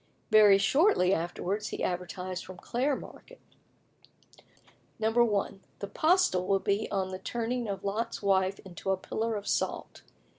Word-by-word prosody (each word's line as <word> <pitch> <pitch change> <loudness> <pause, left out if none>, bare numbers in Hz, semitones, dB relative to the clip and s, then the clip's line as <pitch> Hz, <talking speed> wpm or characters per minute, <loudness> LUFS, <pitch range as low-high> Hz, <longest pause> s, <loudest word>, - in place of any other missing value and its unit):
Very 210 -2 +7
shortly 200 - +3
afterwards 190 +4 -2
he - - -4
advertised 180 +1 -3
from 185 - -10
Clare 265 +4 -1
Market: - - -12 1.6
1. 220 -3 +1 0.2
"The 200 - -5
postil 310 - +2
will 195 - +3
be 200 +2 -1
on 190 -1 -1
the 185 0 -6
turning 235 +3 -3
of 200 -1 -4
Lot's 215 +4 -2
wife 195 -1 +1
into 190 +1 -7
a 190 - +2
pillar 225 +4 -3
of 205 -1 -5
salt. - - -2
200 Hz, 140 wpm, -29 LUFS, 190-230 Hz, 1.6 s, Very